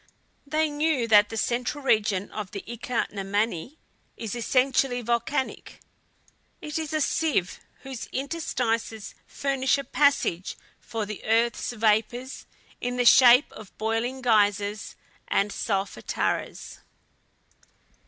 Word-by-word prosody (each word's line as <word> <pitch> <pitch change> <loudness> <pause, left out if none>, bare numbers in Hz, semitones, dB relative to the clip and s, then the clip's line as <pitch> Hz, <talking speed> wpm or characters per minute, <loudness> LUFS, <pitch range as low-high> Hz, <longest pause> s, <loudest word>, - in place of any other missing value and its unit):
They 310 +2 +1
knew 290 -5 0
that 210 -2 +6
the 225 - -5
central 250 +5 -1
region 210 -5 +1
of 210 -3 -5
the 200 - -7
Ika 235 +1 -3
na 200 - -5
Mani 205 - -2 0.4
is 225 -3 -5
essentially 250 +1 +1
volcanic. 235 +4 -2 0.8
It 305 +1 -4
is 315 -2 -4
a 310 0 0
sieve, 290 - 0 0.2
whose 265 -3 -7
interstices 240 -7 -2
furnish 270 -1 0
a 280 - -4
passage 275 -13 +1 0.2
for 225 -2 -4
the 210 0 -7
earth's 230 +2 +1
vapors 225 +3 0 0.3
in 245 0 -3
the 245 - +1
shape 250 +2 +7
of 215 -3 -13
boiling 230 +4 -2
geysers 205 -2 +1 0.3
and 200 +1 +1
solfataras. 195 -2 -3
235 Hz, 115 wpm, -26 LUFS, 215-265 Hz, 0.8 s, shape